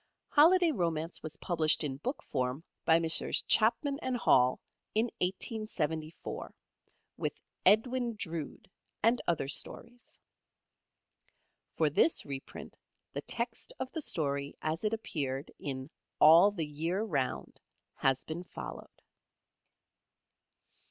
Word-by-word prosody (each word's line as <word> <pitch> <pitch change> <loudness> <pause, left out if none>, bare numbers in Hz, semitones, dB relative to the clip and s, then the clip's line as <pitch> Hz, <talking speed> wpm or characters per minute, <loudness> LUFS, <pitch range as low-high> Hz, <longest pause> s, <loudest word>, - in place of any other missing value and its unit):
"Holiday 335 +3 +6
Romance" 165 - -1
was 155 0 -7
published 160 -2 +2
in 135 -3 -3
book 255 - -4
form 130 +2 -2 0.2
by 160 - +6
Messrs 165 -1 +2
Chapman 275 +6 +3
& - - +1
Hall 125 0 +4 0.4
in 225 +2 +2
1874, 180 - -2 0.6
with - - -2 0.3
"Edwin 235 +3 +3
Drood" 165 -7 -5 0.4
and 230 +3 +4
other 165 -5 0
stories. 235 - -3 1.6
For - - +2
this 330 - +3
reprint 140 -1 -8 0.4
the - - -3
text - - -3
of 260 - -4
the 320 - -4
story 140 - -2
as 160 +4 -2
it 215 +1 0
appeared 140 -10 -4
in 130 -2 -5 0.3
"All 165 +6 +8
the 180 -6 -3
Year 165 +7 -2
Round" 140 -12 -2 0.4
has 135 -1 +1
been 160 +2 -5
followed. - - -9
165 Hz, 110 wpm, -31 LUFS, 145-225 Hz, 1.6 s, All